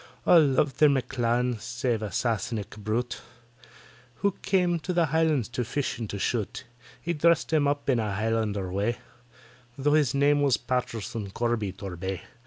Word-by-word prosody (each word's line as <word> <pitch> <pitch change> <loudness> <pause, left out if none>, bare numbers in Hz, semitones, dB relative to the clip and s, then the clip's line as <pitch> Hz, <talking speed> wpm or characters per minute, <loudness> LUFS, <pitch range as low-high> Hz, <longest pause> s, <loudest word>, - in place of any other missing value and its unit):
All 170 -3 +7
loved 140 0 +1
their 150 - +7
M'CLAN, 125 -3 0
save 120 0 -2
a 105 -2 -4
Sassenach 110 -1 -2
brute, 110 +4 -3 0.9
Who 200 - +1
came 180 -3 +2
to 180 +3 -3
the 170 -1 +3
Highlands 155 -5 +1
to 125 +1 -2
fish 135 +3 -2
and 110 -3 -4
to 100 - -4
shoot; 110 +3 -2 0.4
He 170 - -2
dressed 170 +2 +2
himself 145 -2 +2
up - - -7
in 125 - +2
a 105 -3 -2
Highlander 105 -3 -1
way, 105 +5 0 0.8
Tho' 145 +2 +2
his 145 -5 +3
name 145 +1 +4
it - - +1
was 135 -6 +3
PATTISON 115 -4 -3
CORBY 115 -5 -1
TORBAY. 95 -1 -5
120 Hz, 165 wpm, -27 LUFS, 110-145 Hz, 0.9 s, All